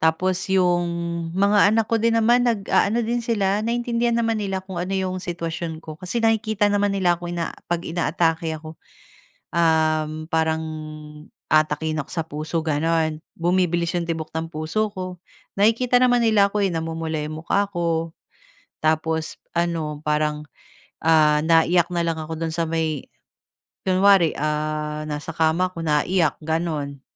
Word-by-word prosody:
tapos 175 +3 +1
yung 180 -2 +3 0.5
mga 200 +1 +5
anak 220 +1 +2
ko 225 +1 0
din 230 +1 +2
naman 240 +2 +4
nag-aano 220 +1 +1
din 240 +1 -1
sila 205 -3 0
naintindihan 235 +1 0
naman 225 -1 +1
nila 195 -2 -2
kung 185 -2 -5
ano 185 +2 -3
yung 185 -1 -2
sitwasyon 165 -2 -5
ko, 155 +1 -9
kasi 225 +6 -2
nakikita 220 -2 +2
naman 205 -1 +1
nila 175 -3 +2
ako, 175 - -5
eh, 170 -1 -2 0.2
'pag 170 0 0
inaatake 165 -1 0
ako. 155 0 -11 0.7
Uhm, 155 -1 +1
Parang 160 0 +1 0.9
aatakihin 155 0 +2
ako 140 - -13
sa 165 -3 -2
puso 155 +1 -4
gano'n. 160 0 0 0.2
Bumibilis 175 0 +1
yung 170 -1 -2
tibok 160 -1 -4
ng 160 0 -3
puso 160 +8 -1
ko, 185 -3 -7 0.4
nakikita 230 +4 +3
naman 245 -1 +4
nila 205 -3 +4
ako, 210 0 -1
eh, - - +1
namumula 160 -1 -3
yung 155 +1 -5
mukha 200 +3 +2
ko, 165 -3 -1 0.7
tapos 160 0 0 0.2
ano 165 -3 -1
parang, 150 0 -1 0.6
ah, 155 -2 +4
naiyak 165 +1 +4
na 175 - 0
lang 165 -1 -1
ako 160 0 -6
do'n 165 -1 -2
sa 170 - +1
may, 160 -3 -2 0.8
kunwari, 190 -2 +4
ah, 150 0 -2
nasa 150 +2 -5
kama 165 +3 +1
ako 165 - -6
naiiyak 160 +1 +1
gano'n. 155 -4 -2
170 Hz, 150 wpm, -23 LUFS, 160-195 Hz, 0.9 s, mga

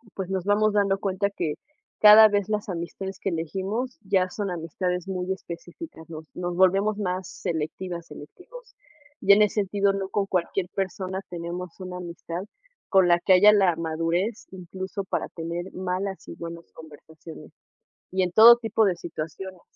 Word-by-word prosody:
pues 190 -1 -4
nos 190 -2 -2
vamos 210 +1 +2
dando 195 -1 +2
cuenta 200 0 -1
que 160 -6 -3 0.5
cada 215 +1 +10
vez 205 0 0
las 210 -1 -2
amistades 185 +2 -5
que 195 - -2
elegimos 195 +9 -3
ya 190 -2 +1
son 200 0 -4
amistades 180 +2 -3
muy 185 -1 -3
específicas, 175 - -10
nos 160 -1 -8
nos 175 -1 -3
volvemos 195 +3 +3
más 185 -2 -2 0.2
selectivas, 170 +2 -4
selectivos, 405 - -13 0.5
y 200 - +7
en 210 - +5
ese 210 - 0
sentido, 200 0 +1
no 195 -1 -3
con 200 0 0
cualquier 180 0 -1
persona 190 0 -3
tenemos 175 +1 -6
una 185 -1 -6
amistad 170 0 -6 0.5
con 190 -3 +5
la 175 0 +4
que 185 - +4
haya 205 +3 +7
la 190 -5 +3
madurez, 165 +6 -2
incluso 190 +1 -6
para - - -2
tener 170 +2 -5
malas 185 +1 -4
y - - -8
buenas 170 0 -9
conversaciones, 160 +1 -13 0.6
y 185 0 +1
en 180 - -1
todo 230 +4 +9
tipo 225 -1 +1
de 190 -3 +1
situaciones. 175 +3 -7
185 Hz, 160 wpm, -25 LUFS, 170-200 Hz, 0.6 s, cada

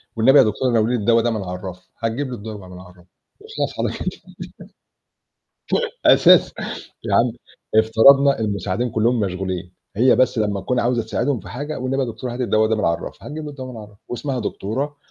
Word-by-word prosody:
والنبي 130 +5 +5
يا - - +8
دكتورة 120 +3 0
ناوليني 115 +1 +2
الدوا 115 +2 +3
ده 120 - 0
من 110 -3 -3
عالرَّف، 90 0 -8
هتجيب 115 +5 -2
له 125 - -4
الدوا 105 -3 -8
من 90 0 -11
عالرَّف 90 -1 -17 0.4
وخلاص 440 +1 -4
على - - -1
كده. - - -5 1.9
أساس - - +5 0.5
يا - - -1
عم 120 0 +3 0.4
افترضنا 135 +6 +5
المساعدين 105 +2 -2
كلّهم 115 +2 +1
مشغولين 95 -2 -3 0.2
هي 125 +4 +4
بس 130 -2 +2
لمّا 105 -2 0
تكون 125 +6 0
عاوزة 120 -1 +1
تساعدهم 120 +3 -1
في - - -12
حاجة، 145 +5 -5
والنبي 130 +1 -1
يا 125 - -2
دكتورة 120 +2 -6
هاتي 125 0 -2
الدوا 110 -1 +2
ده 110 - +1
من 105 - -1
على 85 - +3
الرَّف - - -9
هتجيب 150 +1 -7
له 150 - -6
الدوا 130 -3 -8
من 115 - -9
عالرَّف، 105 -1 -14
واسمها 130 +1 -3
دكتورة، 130 +7 -3
115 Hz, 185 wpm, -21 LUFS, 105-130 Hz, 1.9 s, يا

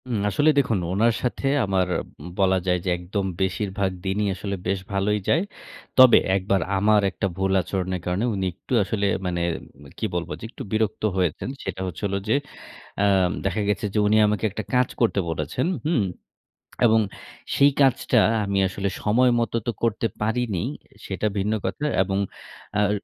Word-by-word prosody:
হুম, 120 -4 -1
আসলে 145 +9 +3
দেখুন 115 -7 +2
ওনার 115 +5 +3
সাথে 125 +2 -2 0.2
আমার 95 -2 +1 0.5
বলা 95 -1 +4
যায় 90 0 +3
যে, - - 0
একদম 95 +3 -3 0.2
বেশিরভাগ 95 0 -1
দিনই 100 +2 0
আসলে 100 +1 -4
বেশ 95 0 0
ভালোই 100 +2 +1
যায়। 165 - +4 0.6
তবে 130 -2 +9 0.2
১ 95 - +1
বার 100 - +4 0.2
আমার 105 +2 +4
একটা 100 - -3
ভুল 95 0 0
আচরণের 95 +1 -3
কারণে 90 +6 0
উনি 95 -2 -1
একটু 95 - -8
আসলে 100 +1 -1 0.2
মানে 90 -1 -1 0.4
উম 75 - -15
কি - - -2
বলব? 85 -1 -2
যে - - -13
একটু - - -8
বিরক্ত 110 -1 0
হয়েছেন। 90 +4 0
সেটা - - -4
হচ্ছে 90 - -7
হলো 100 0 -1
যে, - - +4 0.6
অ্যা 100 - +3 0.4
দেখা 95 +2 0
গেছে 105 +2 0
যে - - -1
উনি 110 +1 +4
আমাকে 105 +1 -1
একটা 110 +2 -4
কাজ 125 -1 +4
করতে 115 -3 +3
বলেছেন। 80 - -2 0.2
হুম? 155 -10 +2 0.8
এবং 110 0 +5 0.6
সেই 140 +1 +5
কাজটা 130 -2 +3 0.3
আমি 100 0 0
আসলে 100 +2 -2
সময়মত 120 +1 +2
তো - - +2
করতে 115 -1 +1 0.2
পারিনি, 110 -4 0 0.4
সেটা 100 +2 -2
ভিন্ন 100 +2 0
কথা। 150 - -3 0.2
এবং 95 +1 -1 0.6
আর 105 -1 +3
100 Hz, 165 wpm, -24 LUFS, 95-115 Hz, 0.8 s, তবে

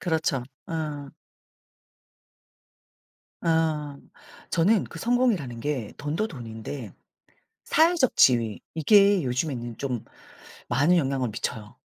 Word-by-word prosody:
그렇죠. 160 -6 0 0.2
어. 150 -4 -4 2.3
어. 155 -3 0 0.5
저는 190 +5 +3
그 165 - -10
성공이라는 225 - +1
게 130 -6 -3
돈도 155 +9 -2
돈인데 115 - -7 0.7
사회적 320 -4 +3
지위 115 -4 +4
이게 200 +4 +5
요즘에는 125 -2 -2
좀 125 -5 -3 0.6
많은 145 +8 +3
영향을 135 -5 0
미쳐요. 110 -1 -5
145 Hz, 195 characters per minute, -26 LUFS, 125-170 Hz, 2.3 s, 이게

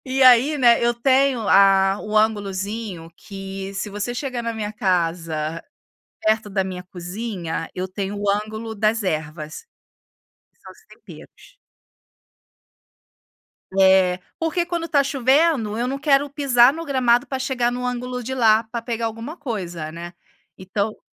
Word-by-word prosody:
E 265 +1 +1
aí, 255 +4 +6
né, 235 -2 +5
eu 240 - +2
tenho 260 -2 +2
a 195 0 +5
um 215 0 -3
ângulozinho 205 -4 -1
que 195 -1 -7
se 195 +2 -3
você 210 +4 -4
chegar 255 -2 -4
na 230 0 -2
minha 215 -1 -4
casa, 165 -5 -1 0.6
perto 215 -1 +1
da 195 -1 0
minha 185 -1 -6
cozinha, 180 -2 -5
eu 185 +1 -3
tenho 200 +1 -4
o 205 -1 +1
ângulo 215 +2 -3
das 215 +1 +1
ervas. 155 - -4 1.0
São - - -11
os - - -21
temperos. - - -16 2.2
É. 190 -1 +4 0.2
Porque 335 +1 0
quando 340 -1 -3
está 285 -4 +2
chovendo, 270 -4 +2
eu 245 +1 -1
não 275 - -2
quero 285 -1 +2
pisar 265 -3 +4
no 330 +1 -6
gramado 250 -3 +2
pra 265 - -3
chegar 255 -2 0
no 250 0 -4
ângulo 250 0 -3
de 260 - -4
lá, 225 -2 +4
pra 230 +1 -6
pegar 230 -1 -3
alguma 230 +9 -6
coisa, 175 - -5
né. 170 +1 -8 0.4
Então 200 +3 -3
220 Hz, 145 wpm, -22 LUFS, 190-250 Hz, 2.2 s, aí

